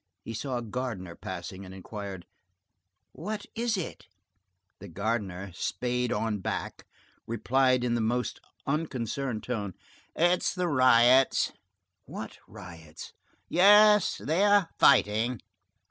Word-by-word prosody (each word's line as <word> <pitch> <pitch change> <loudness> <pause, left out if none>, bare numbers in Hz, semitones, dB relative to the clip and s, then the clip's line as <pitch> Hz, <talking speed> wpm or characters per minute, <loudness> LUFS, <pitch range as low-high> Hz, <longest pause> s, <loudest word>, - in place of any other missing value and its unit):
He 115 - -6
saw 125 +3 -3
a 120 - -4
gardener 110 -7 -5
passing, 95 +1 -7
and 95 0 -10
inquired:— 95 -1 -8 0.9
"What 210 +5 -6
is 230 -2 -1
it?" 180 - -6 0.7
The - - -10
gardener, 100 -1 -3
spade 125 +7 -2
on 110 -2 -1
back, - - -5 0.4
replied 130 +2 +2
in 120 -1 0
the 120 - 0
most 120 +3 -1 0.3
unconcerned 135 -5 -2
tone:— 105 -7 -4 0.4
"It 175 +2 +3
is - - -1
the 180 -1 -1
riots." 130 -2 +4 0.5
"What - - -8
riots?" 85 -6 -11 0.3
"Yes, 210 +2 +6
they 165 +7 0
are 205 -4 +4
fighting." 115 -1 +4
120 Hz, 115 wpm, -28 LUFS, 105-150 Hz, 0.9 s, Yes